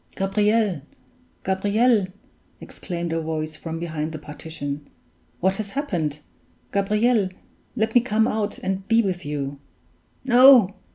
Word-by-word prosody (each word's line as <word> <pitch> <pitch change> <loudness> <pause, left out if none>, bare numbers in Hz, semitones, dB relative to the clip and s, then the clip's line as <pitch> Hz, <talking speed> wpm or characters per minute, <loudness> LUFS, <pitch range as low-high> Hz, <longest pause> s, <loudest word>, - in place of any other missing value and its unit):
"Gabriel 205 -2 +1 0.6
Gabriel!" 205 +3 +2 0.5
exclaimed 170 -2 -5
a 165 - -1
voice 155 -1 -3
from 165 -1 -6
behind 160 -2 -3
the 155 - -6
partition. 150 -1 -7 0.5
"What 190 +2 +2
has 215 -2 -4
happened? 175 - -2 0.5
Gabriel! 210 +1 +2 0.5
let 220 +1 0
me 245 - +6
come 220 -1 +1
out 215 -3 -2
and 190 0 -3
be 230 +1 +4
with 185 -3 -3
you!" 140 -1 -4 0.7
"No! 245 -5 +7
190 Hz, 120 wpm, -23 LUFS, 160-220 Hz, 0.7 s, No